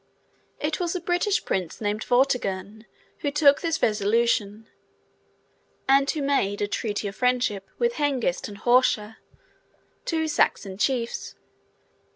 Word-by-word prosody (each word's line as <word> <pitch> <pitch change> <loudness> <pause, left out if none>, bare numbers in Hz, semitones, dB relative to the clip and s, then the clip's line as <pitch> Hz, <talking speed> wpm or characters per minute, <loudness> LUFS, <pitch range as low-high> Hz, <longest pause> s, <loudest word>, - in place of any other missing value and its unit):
It 305 +1 -2
was 350 0 -1
a - - -1
British 355 +4 0
Prince 180 -4 -2
named 210 0 -2
Vortigern 220 -5 0 0.3
who 290 - -1
took 285 0 +4
this 330 -2 -1
resolution, 215 0 +1 1.2
and 275 +1 +4
who 300 - -1
made 235 -8 +1
a 205 - 0
treaty 205 0 -2
of 200 - -6
friendship 245 -6 0
with 475 0 +1
Hengist 270 -11 0
and 205 - -9
Horsa, 225 -2 +2 0.9
two 320 -1 0
Saxon 195 -9 0
chiefs. 240 -1 -1
240 Hz, 125 wpm, -25 LUFS, 205-285 Hz, 1.2 s, took